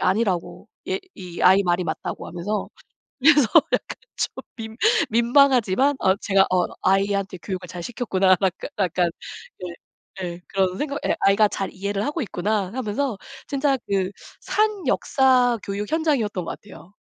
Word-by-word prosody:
아니라고 190 -3 -1 0.2
"얘 380 0 0 0.2
이 180 -2 -7
아이 190 +2 +6
말이 175 0 0
맞다."고 - - -4
하면서 190 +5 -3 0.5
그래서 290 -3 +5 0.2
약간 - - -1 0.2
좀 - - -3
민 220 -1 -7 0.3
민망하지만 250 +1 +3
어 190 0 +3
제가 195 -2 +3
'어 180 -1 +2 0.2
아이한테 195 0 +1
교육을 185 -2 -5
잘 175 0 -7
시켰구나.' 190 -4 +1
약 190 -2 +2 0.3
약간 175 -2 +1 0.5
네. 180 -2 -6 0.5
예. 175 -1 -5
그런 190 -1 0
생각 285 +2 -3
예. - - +1
'아이가 200 +2 +5
잘 195 - -4
이해를 200 +3 -3
하고 300 +2 -2
있구나.' 200 -2 -1
하면서 250 -1 -2 0.3
진짜 275 0 +1
그 195 -1 0 0.3
산 425 -2 0
역사 255 -3 +3
교육 200 +3 -4
현장이었던 260 - 0
것 - - -4
같아요. 200 -2 -15
200 Hz, 300 characters per minute, -23 LUFS, 185-255 Hz, 0.5 s, 아이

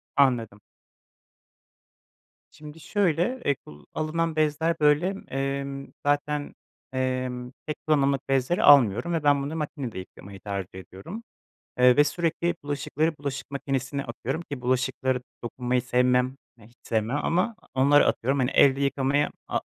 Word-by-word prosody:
Anladım. 115 -7 +2 1.9
Şimdi 150 +1 -12
şöyle, 200 - 0
eee, 140 - +3
kul 75 - -16
alınan 160 +1 -1
bezler 155 +2 +1
böyle, 150 +6 +3
emm, 135 0 -3 0.2
zaten, 145 0 0 0.4
emm, 130 -1 -2
tek 150 - -4
kullanımlık 140 -2 +2
bezleri 135 +6 +1
almıyorum 140 - +6
ve 160 -3 -1
ben 145 -1 +3
bunu 145 +3 -4
makinede 145 - -4
yıkamayı 95 +1 -11
tercih 95 -2 -5
ediyorum, 100 - -9 0.6
eee, 125 +1 +6
ve 145 - +8
sürekli 170 +2 -1
bulaşıkları 150 +2 -1
bulaşık 140 -1 -5
makinesine 140 0 -2
atıyorum 130 +6 -4
ki 145 -6 -7
bulaşıklara 130 0 0 0.2
dokunmayı 125 +1 -1
sevmem, 125 +1 +2 0.2
eee, 105 -2 -17
hiç 120 +2 -25
sevmem 110 +4 -1
ama 190 +7 +1 0.2
onları 140 +2 +5
atıyorum 135 +4 +1
hani 130 +1 +1
elde 135 0 +5
yıkamayı 140 +1 +1 0.2
a - - 0
140 Hz, 130 wpm, -26 LUFS, 125-150 Hz, 1.9 s, ve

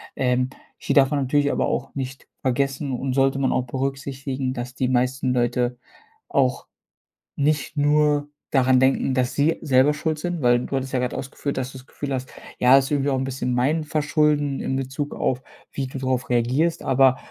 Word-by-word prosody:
Ähm, 125 0 +1 0.3
hier - - -2
darf 135 -1 +5
man 145 - +1
natürlich 145 +2 +2
aber - - 0
auch 135 - -3
nicht 135 -1 -6
vergessen 135 +2 -1
und 130 +1 -2
sollte 135 +1 +2
man 135 - +1
auch 130 - 0
berücksichtigen, 135 0 -3
dass 125 0 -5
die 130 0 0
meisten 130 +1 +1
Leute 120 0 0 0.5
auch 130 -2 +1 0.7
nicht 150 +1 0
nur 145 0 +2 0.2
daran 130 -1 +4
denken, 130 0 +2
dass 125 -1 0
sie 150 +3 +2
selber 135 -1 +4
schuld 155 +1 -2
sind, 175 0 -3
weil 120 -1 +4
du - - -3
hattest 135 0 -3
ja 130 - +1
gerade 125 0 -2
ausgeführt, 135 +1 -4
dass 130 0 -2
du - - -8
das 130 - -17
Gefühl 140 -1 -5
hast: 130 0 -3 0.3
„Ja, 125 +2 +7
ist 135 +1 +1
irgendwie 145 -1 +1
auch 130 - +1
'n 130 - -1
bisschen 130 -1 -2
mein 140 +6 +1
Verschulden“ 150 -2 +1
in 130 - -2
Bezug 135 +2 -4
auf, 130 -1 -1 0.3
wie 135 -2 -3
du 135 +1 -7
drauf 130 -1 -1
reagierst, 125 +8 +1
aber 130 0 +4
135 Hz, 190 wpm, -23 LUFS, 130-145 Hz, 0.7 s, Ja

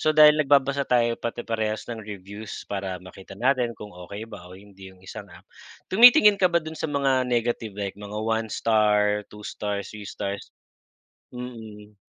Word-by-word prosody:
so - - +1
dahil 150 0 +8
nagbabasa 140 -1 +2
tayo 120 -1 +2
pati 120 0 -4
parehas 110 -1 -2
ng 115 -2 -6
reviews, 100 0 -8
para 95 -2 -4
makita 95 +1 -12
natin 125 -1 +1
kung 105 -1 -10
okey 95 +5 -8
ba 90 -5 -11
o 90 - -12
hindi 95 -1 -14
yung 95 0 -19
isang - - -9
app, - - -16 0.5
tumitingin 215 -2 +7
ka 185 - +5
ba 170 -2 0
dun 160 - -6
sa 160 - -2
mga 135 -3 +1
negative, 115 -3 -1
like 100 -2 -3
mga 105 0 -8
1 110 0 -1
star, 105 -2 +2
2 105 0 -13
stars, 100 -1 -4
3 105 -1 -8
stars? 100 0 -5 0.8
Mm. 110 -4 -10
110 Hz, 175 wpm, -25 LUFS, 100-125 Hz, 0.8 s, dahil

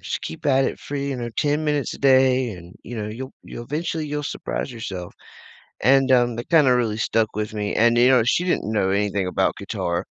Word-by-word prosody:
"Just - - -4
keep 80 - -7
at 135 -1 +3
it - - -4
free," 140 -1 -4
you 135 - -2
know, 120 -1 -4
"10 150 +6 0
minutes 150 -2 -1
a - - -10
day," 130 -2 +4
and, 90 -3 -11
you 120 - -7
know, 105 -1 -4
"you'll 130 +5 -7
you'll 120 - -8
eventually, 160 +2 -3
you'll 150 0 -3
surprise 145 - -4
yourself." 95 -7 -7 0.7
And, 135 +2 +4
um, 120 -2 +3
that 120 - -6
kinda 150 -6 +5
really 115 -3 0
stuck 110 0 0
with 105 0 -3
me 105 -1 -2
and, 120 +1 +4
you 120 +1 +6
know, 130 -2 +5
she 125 +9 +1
didn't 180 -11 -1
know 100 -3 +1
anything 100 -1 0
about 90 - 0
guitar, 85 0 -3
120 Hz, 220 wpm, -22 LUFS, 105-135 Hz, 0.7 s, you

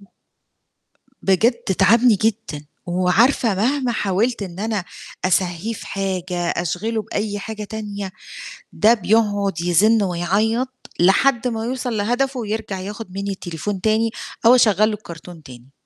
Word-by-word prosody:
و - - -17
آآ، - - -24 1.2
بجد 220 +6 +4
تعبني 230 +4 +4
جدًا، 210 -8 -2 0.2
وعارفة 195 +6 +2
مهما 250 +5 +1
حاولت 215 +2 0
إن 185 -1 -8
أنا 215 -2 -1 0.4
أسهّيه 185 +3 0
في - - -9
حاجة، 185 -2 -3
أشغِله 180 +7 -2
بأي 205 -1 -3
حاجة 215 +1 -6
تانية 205 -2 -6 0.6
ده 220 +3 +4
بيقعُد 205 -4 +1
يزِن 205 +6 +3
ويعيّط 215 +8 -1
لحد 235 +7 +3
ما 225 -2 -3
يوصل 245 -1 -3
لهدفه، 245 +5 0
ويرجع 215 -3 -4
ياخُد 205 +1 -7
منّي 200 +1 -3
التليفون 185 +1 -5
تاني 220 +2 +2 0.4
أو 240 - +8
أشغّل 215 -3 +4
له 220 - -2
الكرتون 170 -4 -10
تاني. 125 0 -14
205 Hz, 130 wpm, -21 LUFS, 185-225 Hz, 1.2 s, أو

